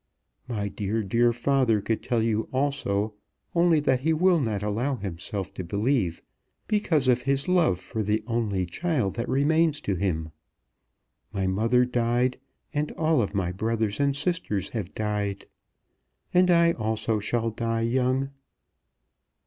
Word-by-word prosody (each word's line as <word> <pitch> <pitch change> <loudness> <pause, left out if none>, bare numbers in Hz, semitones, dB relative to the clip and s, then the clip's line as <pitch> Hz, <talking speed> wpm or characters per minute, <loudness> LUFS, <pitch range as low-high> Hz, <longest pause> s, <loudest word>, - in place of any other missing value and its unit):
My 105 -5 -2
dear, 105 +2 -2
dear 115 +5 +3
father 120 -2 +2
could 110 +2 -2
tell 115 -2 0
you 110 -1 0
also; 110 -7 0 0.4
only 170 -2 +4
that 130 -3 +2
he 160 +5 +1
will 175 +2 +4
not 110 -7 -1
allow 115 +7 0
himself 95 -1 -5
to 95 - -5
believe, 100 -1 0 0.4
because 185 - +1
of 125 -1 +4
his 140 +1 0
love 175 - +3
for 110 +3 -4
the 105 +1 0
only 110 -6 -1
child 125 - -1
that 120 +1 -4
remains 150 +3 +2
to 100 - -1
him. 85 -4 -2 1.0
My 100 -2 -1
mother 115 +6 +3
died; 125 +1 0 0.3
and 150 0 -1
all 155 -6 +2
my 90 -3 0
brothers 110 +3 -1
and 140 -1 +2
sisters 140 - -1
have 105 -6 -5
died. 105 -2 -2 0.9
And 180 0 +5
I 170 -1 +5
also 110 -3 -1
shall 115 +2 -1
die 115 +1 -1
young. 130 +3 +1
115 Hz, 140 wpm, -26 LUFS, 105-140 Hz, 1.0 s, And